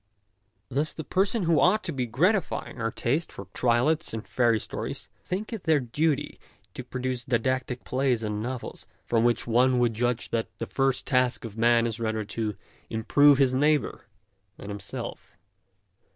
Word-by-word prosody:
Thus 145 +4 0
the 160 - -6
persons 190 - +1
who 165 -2 +3
ought 200 +5 +4
to 170 - -3
be 125 -3 -2
gratifying 160 - 0
our 115 - 0
taste 140 +8 -1
for 100 - -9
triolets 125 +4 +1
and 110 - -6
fairy 120 -3 +2
stories - - -5
think 200 +6 -4
it 220 - -6
their 160 -2 +4
duty 145 +4 -1 0.3
to 130 - -6
produce 130 0 -3
didactic 125 +1 -1
plays 130 -3 0
and 105 -1 -2
novels, 125 +2 -6 0.2
from 115 -1 +2
which 120 0 +2
one 125 +2 +3
would 120 -2 +2
judge 120 +1 -1
that 115 -1 0
the - - -3
first 135 -2 0
task 125 -3 +1
of 110 -2 -8
man 115 +1 +4
is 115 -1 -3
rather 110 -2 -1
to 105 -1 -3 0.3
improve 140 +6 +4
his 135 -2 +3
neighbour 150 +1 +1 0.5
than 100 - -9
himself. 100 -1 -7
125 Hz, 165 wpm, -27 LUFS, 115-145 Hz, 0.5 s, ought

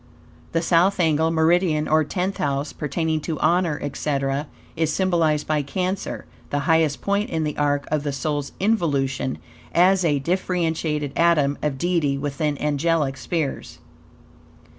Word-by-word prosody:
The 165 0 +1
South 180 +4 +3
angle, 160 -1 +3
meridian, 160 -1 +2
or 155 0 +3
Tenth 185 +5 -2
House, 140 +1 -1
pertaining 160 +1 -1
to 160 0 -4
honor, 170 -3 +2
etc., 140 0 -2 0.3
is 160 -1 0
symbolized 165 -4 +1
by 155 -1 +1
Cancer; 185 +6 -3 0.2
the 145 - -1
highest 160 -2 +2
point 200 +1 0
in 160 -1 -1
the 150 -1 -2
arc 145 -1 0
of 155 -1 +1
the 145 -1 -2
soul's 145 +1 -2
involution, 140 - 0 0.4
as 185 +2 +5
a 150 -4 +2
differentiated 160 -3 -1
atom 155 -4 +3
of 150 -3 -1
Deity 160 -3 +1
within 145 +1 -2
angelic 150 -1 +1
spheres. 135 - -3
155 Hz, 140 wpm, -23 LUFS, 145-170 Hz, 0.4 s, as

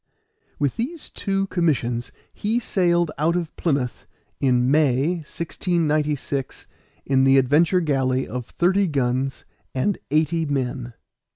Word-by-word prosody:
With 145 - -1
these 290 +8 -4
two 195 -1 -1
commissions 125 -9 0 0.2
he 215 +3 -1
sailed 175 -7 +1
out 165 +3 +2
of 170 -3 -3
Plymouth 140 -7 -1 0.3
in 125 -1 +2
May, 150 +3 +3
1696, 150 -4 -2 0.4
in 135 -1 +3
the 135 0 +5
Adventure 155 +7 +4
galley 135 -4 0
of 125 -2 -5
thirty 190 +3 +2
guns 135 -2 -1 0.3
and 155 +10 0
eighty 160 +3 +1
men. 130 -3 -2
150 Hz, 115 wpm, -23 LUFS, 130-175 Hz, 0.4 s, the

